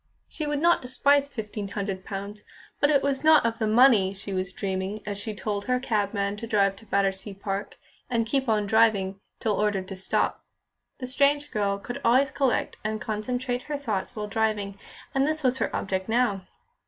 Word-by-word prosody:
She 305 - -5
would 295 0 0
not 345 +2 +4
despise 280 +2 +3
fifteen 215 -6 -5
hundred 195 -2 -4
pounds; 200 +1 -6 0.4
but 290 - +4
it 285 -2 +3
was 275 0 0
not 310 -4 +6
of 230 0 -1
the 220 - +1
money 215 -4 +5
she 200 0 -6
was 185 -1 -2
dreaming 190 +2 -3
as 205 -1 -3
she 215 +1 -4
told 205 0 -3
her 250 0 +1
cabman 205 -4 -1
to 230 - -6
drive 200 -3 +2
to 225 - -16
Battersea 195 0 0
Park, 195 0 -4 0.3
and 230 -2 +1
keep 265 +2 0
on 210 -2 +2
driving 200 -3 +3 0.2
till 220 - 0
ordered 205 -2 0
to 195 - -5
stop. 185 - -1 0.5
The 255 - -5
strange 285 +3 +2
girl 200 -2 0
could 240 +5 -7
always 260 +4 +4
collect 270 -2 0
and 215 0 -2
concentrate 245 +4 -2
her 295 - -1
thoughts 220 -6 -3
while 210 -1 -3
driving, 210 -2 -1 0.4
and 270 +1 +2
this 310 -1 -1
was 260 0 +2
her - - +1
object 190 +1 -2
now. 220 -5 +1
215 Hz, 190 wpm, -26 LUFS, 200-255 Hz, 0.5 s, not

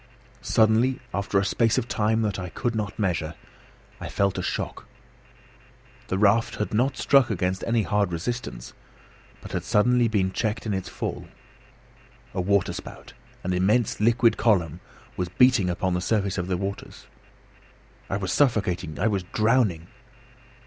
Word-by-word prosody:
Suddenly, 115 +4 +3
after 100 0 -1
a 100 - +2
space 115 +3 +2
of 115 - 0
time 110 +1 +1
that 105 -2 -1
I 90 -1 -5
could 120 +6 -2
not 105 -2 -3
measure, 85 -6 -1 0.6
I - - -6
felt 100 -1 0
a - - -1
shock. - - -4 1.2
The 95 - -1
raft 115 +4 +3
had 105 - -3
not 130 +5 +1
struck 135 +1 +4
against 95 -2 -1
any 115 -1 +2
hard 100 +1 0
resistance, 85 - -5 0.7
but - - -10
had - - -2
suddenly 120 +3 +3
been 100 -4 0
checked 110 +3 -2
in 105 - -1
its 95 -1 -3
fall. - - -5 1.1
A - - -1
waterspout, 100 +1 -2 0.3
an 90 - -1
immense 105 +6 +1
liquid 115 +1 +3
column, 90 -8 +1 0.4
was 90 -1 -2
beating 125 -2 +4
upon 95 +1 -1
the 90 - -1
surface 100 -2 0
of 90 - -3
the 95 -1 -1
waters. 100 +2 -6 1.0
I 95 - -1
was 95 -3 -3
suffocating! 95 - +1
I 100 - 0
was 100 -3 0
drowning! 105 -3 +1
100 Hz, 150 wpm, -25 LUFS, 90-115 Hz, 1.2 s, struck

